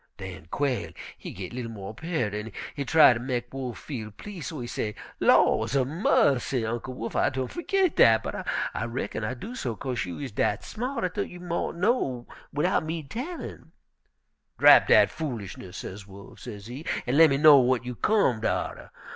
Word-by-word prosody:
"Den 80 - -8
Quail 125 - -1 0.2
he - - -9
git 95 +3 -7
li'l 120 -2 -4
mo' 100 -2 -7
pearter, 120 -7 -2
an' 110 +1 -7 0.2
he 140 - -3
try 150 -1 +7
ter 115 - -4
mek 120 0 -3
Wolf 130 -3 -5
feel 115 -8 -6
please', 175 - -8
so 160 -5 -6
he 120 - -4
say, 105 -3 -3 0.2
'Laws 110 +5 +4
a 135 -2 +3
mussy! 135 - +2
Uncle 120 +3 -4
Wolf, 115 - -5
I - - +3
done 130 -1 -3
fergit 370 0 0
dat, 110 0 +6
but - - -5 0.3
I 115 - -2
reckon 120 -1 -4
I 125 +4 -2
do 210 - -8
so 125 - -3
'kase 125 -3 -3
you 90 -1 -6
is 135 -4 -5
dat 105 - 0
smart 250 +5 -4
I 180 - +1
thought - - -3
you 180 - -10
mought 175 -1 -3
know 170 - 0 0.3
widout 155 +5 +1
me 160 0 -4
tellin'.' 265 - -7 0.8
"'Drap - - +8
dat - - +6
foolishness,' 105 - -6
sez 100 +1 -8
Wolf, 100 +1 -13
sezee, 120 +5 -8 0.2
'an' 125 - 0
lemme 155 -4 +6
know 150 -3 +8
w'at 125 -1 +1
you 125 - -4
comed 125 - +1
atter.' - - -2
130 Hz, 185 wpm, -27 LUFS, 115-160 Hz, 0.8 s, Drap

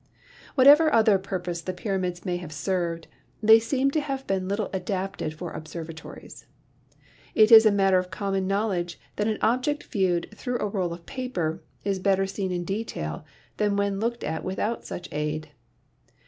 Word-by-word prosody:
Whatever 295 +4 +7
other 220 -5 +5
purpose 180 -3 -4
the 185 - -4
pyramids 185 -2 -3
may 180 -2 -1
have 175 -3 -8
served, 170 +1 -2 0.4
they 220 +1 +8
seem 265 +4 0
to 310 - +1
have 270 -2 -4
been 190 -1 -1
little 200 +1 -2
adapted 185 -4 -3
for 170 +1 -6
observatories. 160 0 -9 0.9
It 215 +1 +6
is 225 -1 +10
a - - +5
matter 195 -2 +4
of 180 0 -5
common 195 +1 -2
knowledge 195 -4 -1 0.2
that 210 - 0
an 215 -1 0
object 255 +7 +1
viewed 185 -6 0
through 245 +3 -3
a - - -2
roll 190 -4 -1
of 170 0 -8
paper 180 -11 -3 0.2
is 195 -1 -1
better 195 0 +2
seen 195 -1 -3
in 175 -1 -2
detail 170 - -4 0.3
than 205 -1 +1
when 200 -1 0
looked 235 +2 -2
at 160 +1 -3
without 210 +5 -2
such 180 - -6
aid. 150 0 -3
195 Hz, 165 wpm, -26 LUFS, 175-220 Hz, 0.9 s, is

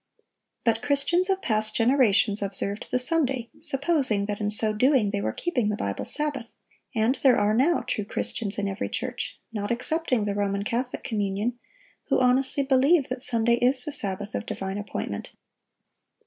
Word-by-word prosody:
But 225 -1 +1
Christians 290 +8 +2
of 385 0 0
past 215 -2 0
generations 225 -4 +3
observed 200 +1 -3
the - - +1
Sunday, 260 -3 +1
supposing 270 -8 0
that 205 0 -4
in 205 - 0
so 215 +1 +1
doing 245 -2 +3
they 200 -1 -2
were - - -1
keeping 250 -12 -1
the 210 - 0
Bible 100 - -3
Sabbath; 290 -6 -3 0.4
and 225 +3 +2
there 265 -3 +5
are 205 +1 +2
now 285 +9 +3
true 210 - -2
Christians 205 +1 0
in 200 -1 -1
every 195 +1 -3
church, - - -4
not 205 0 -3
excepting 250 -1 0
the 205 - -1
Roman 200 0 -1
Catholic 245 +4 -3
communion, 210 +2 -2 0.5
who - - +1
honestly 260 +2 +3
believe 275 +3 +3
that 255 0 -4
Sunday 235 -1 +2
is 250 +1 +2
the 300 - -3
Sabbath 205 -6 -3
of - - -4
divine 195 +1 -4
appointment. 205 - -5
235 Hz, 165 wpm, -26 LUFS, 205-270 Hz, 0.5 s, there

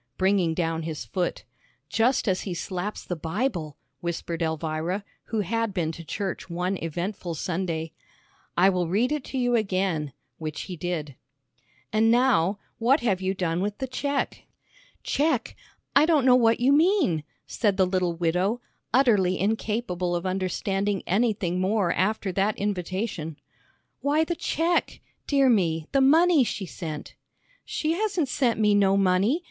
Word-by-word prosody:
bringing 190 -4 +2
down 165 -1 -1
his 155 -6 -5
foot, 175 - -2 0.4
"Just 235 +2 +2
as 185 -2 +1
he 185 -3 -4
slaps 185 +4 -4
the 175 - -3
Bible," 165 - -2 0.2
whispered 170 0 -4
Elvira, 160 +4 -2 0.2
who 225 -2 -1
had 225 +1 -1
been 165 -3 0
to 165 +1 -9
church 190 +3 -4
one 180 +3 -1
eventful 175 +1 -4
Sunday. 165 -1 -2 0.7
"I 180 +2 +6
will 180 -2 0
read 220 - +1
it 300 -3 -1
to 270 - -5
you 245 -1 +1
again," 185 - 0 0.3
which 155 -1 -4
he 185 - -6
did. 160 -4 -3 0.8
"And 220 +1 +4
now, 230 -6 +3 0.2
what 255 +6 +3
have 195 -6 +1
you 190 +1 -1
done 175 -2 -1
with 205 +1 -2
the 265 - -2
check?" 280 +2 -2 0.6
"Check? 290 -4 0 0.4
I 290 +3 +6
don't 305 -6 +3
know 250 -1 +7
what 230 -2 +4
you 255 +3 +4
mean," 305 - +3 0.2
said 205 -4 0
the 190 - +4
little 180 -2 0
widow, 180 +7 0 0.3
utterly 210 -8 +3
incapable 200 -4 -1
of 175 +1 -3
understanding 195 +1 -1
anything 195 -3 +1
more 195 -1 +1
after 200 +1 0
that 195 +3 0
invitation! 185 -4 -3 0.6
"Why, 295 +3 +2
the 345 - -1
check, 335 +2 0 0.3
dear 275 -2 +4
me, 170 -9 +2
the 275 - +3
money 320 +2 +5
she 210 -4 -3
sent." 155 -3 -7 0.5
"She 310 - -2
hasn't 365 -5 0
sent 245 -4 +1
me 210 -1 +4
no 195 -1 +4
money. 195 - +3
195 Hz, 150 wpm, -26 LUFS, 175-235 Hz, 0.8 s, know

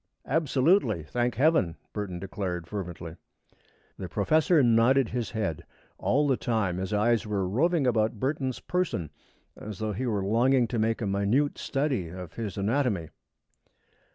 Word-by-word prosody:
"Absolutely, 135 - +2
thank 120 +9 -1
Heaven!" 130 - +3 0.2
Burton 100 -4 -4
declared, 90 -2 -4
fervently. 85 -3 -6 0.8
The 95 - -5
professor 155 - +3
nodded 120 +2 +4
his 120 -2 -3
head. 105 -8 -3 0.4
All 145 +3 +2
the 135 -3 +2
time 110 -7 -1
his 95 +2 -3
eyes 110 +2 +2
were 100 -3 -1
roving 150 - +2
about 110 -2 +1
Burton's 130 -1 -2
person, 150 - -2 0.4
as 105 -2 -8
though 110 +1 -2
he 130 +6 -3
were 100 -4 -1
longing 120 +4 +3
to 120 - -1
make 115 +1 0
a - - 0
minute 100 +9 +1
study 135 - -1
of 90 -1 -8
his 105 -5 -5
anatomy. 100 - 0
110 Hz, 145 wpm, -27 LUFS, 95-130 Hz, 0.8 s, nodded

